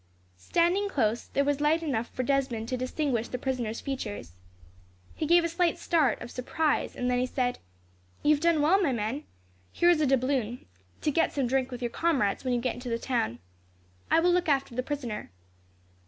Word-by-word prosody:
Standing 350 - +1
close, 235 - 0
there 280 - +1
was 290 0 0
light 315 +3 +2
enough 240 -7 -1
for 255 - -3
Desmond 260 -4 0
to 255 - 0
distinguish 255 -2 -1
the 250 - -4
prisoner's 245 -4 -3
features. 230 - -5 0.8
He 310 - -3
gave 345 +1 +5
a - - +1
slight 335 0 +1
start 305 -9 +2
of 240 - -9
surprise, 300 +4 -1
then 250 0 -1
he 255 - +1
said: 250 -1 -1 0.6
"You 295 - +5
have 295 - -1
done 335 -3 +3
well, 375 +6 +4
my 290 -8 +2
men. 235 +6 -3 0.5
Here 345 0 +4
is 325 -3 +2
a 300 - +3
doubloon, 255 -3 0 0.4
to 300 - +1
get 325 +3 +1
some 275 -3 0
drink 260 +1 0
with 250 -1 -6
your 240 - -1
comrades 270 -13 +1
when 255 - -1
you 245 - +2
get 250 0 -1
into 250 0 -7
the 230 - 0
town. 175 - -1 0.7
I - - +5
will 355 +1 +4
look 355 -2 +1
after 275 -3 +1
the 255 - -1
prisoner." 255 -6 -4
265 Hz, 195 wpm, -28 LUFS, 245-310 Hz, 0.8 s, gave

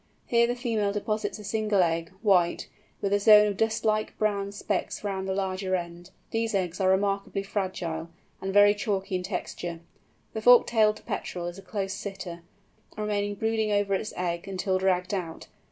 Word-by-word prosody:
Here 235 0 +3
the 245 - -1
female 225 -5 0
deposits 215 +2 -2
a 210 - -10
single 210 -2 +1
egg, 165 0 -1
white, 180 -5 +3 0.3
with 200 0 0
a 205 - +3
zone 210 0 +8
of 205 -1 -1
dust 225 0 0
like 215 0 0
brown 200 -2 0
specks 205 0 -3
round 195 -2 -3
the 190 - -1
larger 190 -1 -1
end. 175 0 -6 0.2
These 225 -1 -1
eggs 185 -1 -1
are 185 - +3
remarkably 195 +1 0
fragile, 180 -5 -3 0.3
and 195 - -2
very 205 +1 +6
chalky 205 -2 -2
in 180 - 0
texture. 175 -2 -5 0.5
The 220 - -3
Fork 245 +1 +7
tailed 215 -2 +2
Petrel 175 -1 -4
is 175 +2 -6
a - - -10
close 195 +1 -3
sitter, 190 -4 -6 0.6
remaining 205 -1 -1
brooding 220 0 0
over 205 -1 +1
its 210 +2 -1
egg 175 -1 -2
until 190 0 -1
dragged 185 0 +1
out. 175 -4 -4
200 Hz, 175 wpm, -27 LUFS, 185-210 Hz, 0.6 s, zone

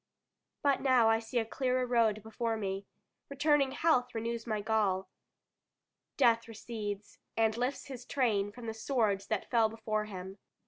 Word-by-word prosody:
But 280 -2 +3
now 255 -4 +5
I 225 - +3
see 225 +2 -4
a 225 - +2
clearer 255 +2 0
road 225 -4 +2
before 225 +1 -2
me. 195 -1 -3 0.4
Returning 280 -1 +2
health 255 -8 +2
renews 230 +1 -3
my 215 -2 0
gall. 200 -3 0 1.1
Death 230 -4 +4
recedes, 210 -2 -6 0.2
and 220 -1 +3
lifts 250 +4 -2
his 260 -3 -8
train 215 -7 +1
from 240 +2 -10
the 225 - -3
swords 220 -4 0
that 215 -3 -2
fell 230 -3 +4
before 215 -1 -2
him. 190 -1 -8
225 Hz, 150 wpm, -32 LUFS, 215-250 Hz, 1.1 s, now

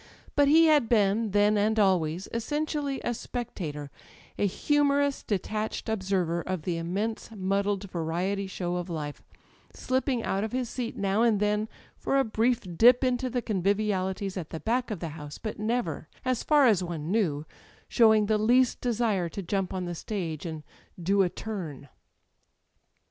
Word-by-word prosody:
But 285 -1 +5
he 320 +3 +6
had 300 -7 +4
been, 215 0 +3
then 205 +1 +3
and 215 +2 +1
always, 185 -3 +2
essentially 290 +3 -2
a 240 - 0
spectator, 170 - -5 0.4
a 205 - +1
humorous 285 +5 +1
detached 215 +2 -3
observer 190 -5 0
of 185 -2 -4
the 170 -1 -1
immense 195 +7 -3
muddled 200 +1 0
variety 180 +4 -1
show 180 -2 -3
of 175 0 -4
life, 150 -3 -5 0.5
slipping 255 -2 0
out 195 +1 -1
of 220 - -4
his 250 -2 -1
seat 245 -3 -4
now 195 +2 +1
and 230 -3 +3
then 210 +1 0 0.3
for 275 - 0
a 270 - +4
brief 230 +1 +1
dip 245 +6 +6
into 255 0 +1
the 245 -1 -2
convivialities 195 -1 0
at 165 -4 -5
the 160 - -5
back 245 +5 0
of 210 -6 -4
the 165 - -3
house, 150 -1 -8
but 215 - -6
never, 215 -9 -2 0.2
as 255 -2 +1
far 295 -2 +4
as 205 -7 +4
one 170 -2 -4
knew, 160 -9 0 0.4
showing 220 -2 +5
the 215 0 +1
least 245 +3 +3
desire 220 -7 0
to 195 +4 -6
jump 195 +1 -1
on 185 -1 -3
the 175 - -4
stage 170 -3 -4
and 160 -2 -6 0.4
do 195 +3 +2
a 185 - +3
"turn." 170 -11 -6
205 Hz, 165 wpm, -28 LUFS, 180-235 Hz, 0.5 s, he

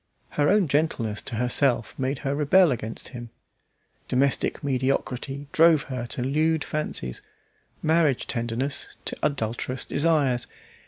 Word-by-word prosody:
Her 145 0 +1
own 200 -3 +4
gentleness 130 -8 0
to - - -5
herself 120 0 +1
made 135 +1 -1
her 135 - +1
rebel 150 +4 +4
against 115 -2 -4
him. 120 -2 -8 0.8
Domestic 140 +3 +1
mediocrity 135 +1 -1
drove 160 -2 +5
her 125 -3 -5
to 120 - -3
lewd 155 +4 +1
fancies, 65 - -3 0.6
marriage 155 -5 +2
tenderness 120 +4 -2
to - - -1
adulterous 125 -1 -2
desires. 140 -5 +1
135 Hz, 120 wpm, -25 LUFS, 120-150 Hz, 0.8 s, drove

